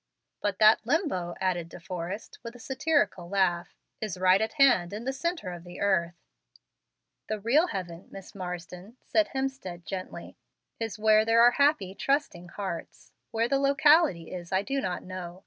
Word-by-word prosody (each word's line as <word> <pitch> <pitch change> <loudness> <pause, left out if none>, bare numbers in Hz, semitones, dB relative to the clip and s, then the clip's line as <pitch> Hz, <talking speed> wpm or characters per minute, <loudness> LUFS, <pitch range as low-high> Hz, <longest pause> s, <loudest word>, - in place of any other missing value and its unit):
"But 205 - -1
that 215 0 +6
Limbo," 230 - -1
added 175 -3 -1
De - - -11
Forrest, 180 +4 -6
with 230 +1 -9
a - - -12
satirical 265 - 0
laugh, 180 -3 0 0.3
"is 210 -5 -3
right 185 +2 +4
at 220 - -1
hand 245 - +4
in 215 +3 -5
the 265 - -1
centre 330 - -3
of 175 -1 -8
the 175 0 -11
earth." 175 -4 +1 1.1
"The 215 -1 -3
real 270 - +3
heaven, 180 - -6
Miss 195 -1 -11
Marsden," 180 +3 -7
said 320 -1 +2
Hemstead, 265 -11 -4
gently, 185 0 -7 0.4
"is 225 -1 -4
where 215 0 +4
there 225 +1 +4
are 240 - +7
happy, 280 -9 +2
trusting 270 -9 -1
hearts. 185 -3 -7 0.2
Where 230 +1 0
the 275 +2 +1
locality 280 - +4
is 175 -2 -7
I 190 +1 +1
do 275 +5 -2
not 180 -5 -3
know. 185 -1 -7
200 Hz, 165 wpm, -28 LUFS, 180-265 Hz, 1.1 s, are